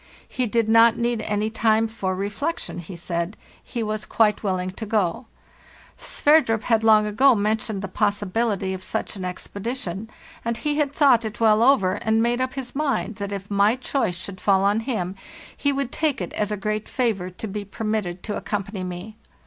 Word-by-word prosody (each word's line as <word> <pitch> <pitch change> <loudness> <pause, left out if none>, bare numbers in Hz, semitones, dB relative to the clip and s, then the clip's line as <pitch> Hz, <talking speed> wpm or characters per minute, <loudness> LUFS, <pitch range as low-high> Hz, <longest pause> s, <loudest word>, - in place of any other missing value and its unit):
He 250 -1 -1
did 230 0 +1
not 230 +1 +6
need 235 -1 0
any 210 +1 -1
time 220 0 +2
for 195 -4 -3
re 195 +2 -2
flection, 210 - -3
he 175 +2 -8
said; 170 +3 -3 0.3
he 235 -2 -4
was 215 0 -3
quite 215 -2 +2
willing 185 -2 -1
to 220 +3 -7
go. 210 +1 0 0.7
Sverdrup 290 -8 +2
had 225 -2 +2
long 215 -1 +6
ago 250 +5 +4
mentioned 215 -1 -1
the - - -2
possibility 205 0 0
of 185 - -6
such - - -3
an 195 - -7
expe 185 +2 -6
dition, 220 -3 -4 0.3
and 235 0 -1
he 295 +3 -1
had 295 -2 +1
thought 275 -5 +4
it 220 0 -5
well 220 -1 +4
over, 235 -8 +4
and 220 0 +2
made 240 +1 +1
up 260 +1 -2
his 265 -2 -5
mind 275 -7 -1
that 200 -1 -4
if 200 0 -6
my 200 +3 +4
choice 255 -8 -1
should 185 +1 -7
fall 195 -1 +3
on 205 +2 +3
him 220 -7 -2 0.4
he 285 - +1
would 275 -2 -2
take 310 -4 0
it 180 - -5
as 210 0 -1
a 210 - -1
great 215 +2 -3
favor 215 -8 0
to 185 +4 -7
be 205 +1 -4
permitted 200 -3 -3
to 210 - -3
accompany 200 -2 -3
me. 180 +4 -7
215 Hz, 195 wpm, -23 LUFS, 195-235 Hz, 0.7 s, not